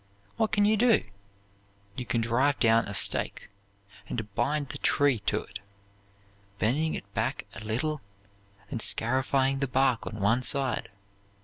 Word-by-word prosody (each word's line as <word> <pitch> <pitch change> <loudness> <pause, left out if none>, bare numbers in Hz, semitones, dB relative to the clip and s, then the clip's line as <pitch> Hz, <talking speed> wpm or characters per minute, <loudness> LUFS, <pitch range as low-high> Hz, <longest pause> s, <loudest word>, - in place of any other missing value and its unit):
What 220 - 0
can 205 -1 +3
you 215 +1 +3
do? 235 +1 +4 0.9
You 125 - -6
can 115 - 0
drive 130 +5 +1
down 115 -1 +3
a 100 - -6
stake, - - +1 0.6
and 110 -3 -5
bind 140 +5 -1
the - - -7
tree 140 -5 +2
to 105 - +1
it, 100 - -9 1.0
bending 150 +10 0
it 100 0 -9
back 120 +6 -2
a 110 - -9
little, 135 +8 -2 0.7
and 115 - -3
scarifying 130 +4 +2
the 140 - 0
bark 130 -2 +1
on 110 - -6
one 115 +5 +2
side. 130 -2 +1
130 Hz, 145 wpm, -27 LUFS, 115-145 Hz, 1.0 s, do